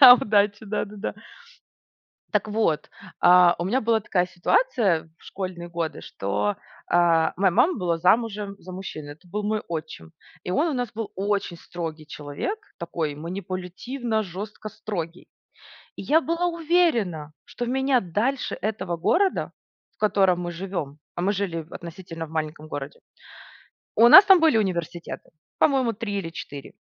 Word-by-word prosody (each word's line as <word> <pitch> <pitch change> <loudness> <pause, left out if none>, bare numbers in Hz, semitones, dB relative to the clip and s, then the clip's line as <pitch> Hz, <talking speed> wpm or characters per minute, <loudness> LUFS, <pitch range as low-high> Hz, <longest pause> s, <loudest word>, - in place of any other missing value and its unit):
да, 250 -3 +12
удачи, 205 -2 +2
да-да-да. 210 0 -3 1.2
Так - - +1
вот, 210 -8 0 0.3
а, 180 0 +7
у 175 - -1
меня 250 +7 +1
была 225 0 +2
такая 180 -3 +1
ситуация 180 - +1
в - - -23
школьные 185 -3 -6
годы, 165 -3 -3
что, 100 +1 -2 0.3
а, 165 -2 +3
моя 190 -1 +3
мама 345 - +4
была 175 -4 0
замужем 205 +2 +1
за 185 - -10
мужчиной, 155 -6 -7
это 165 +5 -23
был 205 +4 -3
мой 215 0 0
отчим. 155 - -6 0.3
И 180 - -4
он 305 - +2
у 305 - -1
нас 245 -3 -2
был 225 -1 -5
очень 195 -3 -1
строгий 160 -2 -6
человек, 150 - -4 0.2
такой 160 -3 -3
манипулятивно-жёстко 200 - -4
строгий. 180 -5 -6 0.7
И - - -7
я 310 +3 +4
была 335 +3 0
уверена, 310 - +1
что 240 - -5
меня 265 +1 +2
дальше 225 +8 -1
этого 195 -5 -2
города, 375 - +1 0.4
в - - -43
котором 190 -4 +3
мы 175 0 -3
живем, 170 -5 -5 0.2
а 175 - -3
мы 200 +3 +2
жили 185 -5 -2
в 160 - -15
относительно 170 -1 -7
в 155 - -15
маленьком 155 -1 -4
городе. 145 -1 -6 1.0
У 235 - +7
нас 380 +10 +11
там 385 -3 +7
были 320 -7 +5
университеты, 175 -5 -3 0.3
по-моему, 265 -5 +3
3 205 -2 -3
или 165 -4 -4
4, 145 -4 -8
190 Hz, 150 wpm, -25 LUFS, 170-225 Hz, 1.2 s, да